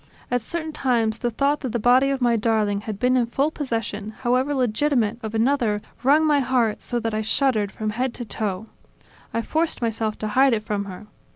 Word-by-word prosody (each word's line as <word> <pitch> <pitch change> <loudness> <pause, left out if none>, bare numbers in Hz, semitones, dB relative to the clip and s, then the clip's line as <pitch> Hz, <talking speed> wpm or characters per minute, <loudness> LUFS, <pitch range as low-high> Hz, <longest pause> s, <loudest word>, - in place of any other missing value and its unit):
At 245 -1 +1
certain 315 +7 -4
times, 230 -6 0
the 240 - 0
thought 280 +5 +1
that 255 -5 -4
the - - +1
body 250 +4 +4
of 275 -1 -1
my 240 -1 +3
darling 215 -2 +1
had 210 -1 -5
been 250 +4 +2
in 245 -2 +2
full 275 +6 0
possession, 225 -7 -3
however 255 +4 +1
legitimate, 245 -2 +1
of 220 -1 -5
another, 230 -3 +2 0.2
wrung 290 +5 +4
my 295 -2 +4
heart 245 -4 +1
so 240 - -2
that 225 -1 -3
I 215 - 0
shuddered 220 -3 +1
from 215 +2 -3
head 250 +4 -1
to 240 - -6
toe. 205 -2 -3 0.7
I 230 - -1
forced 320 +5 -1
myself 225 -2 -1
to 215 - -3
hide 265 +4 +4
it 215 -2 -1
from 205 -1 -2
her. 190 +1 -9
235 Hz, 205 wpm, -23 LUFS, 215-265 Hz, 0.7 s, body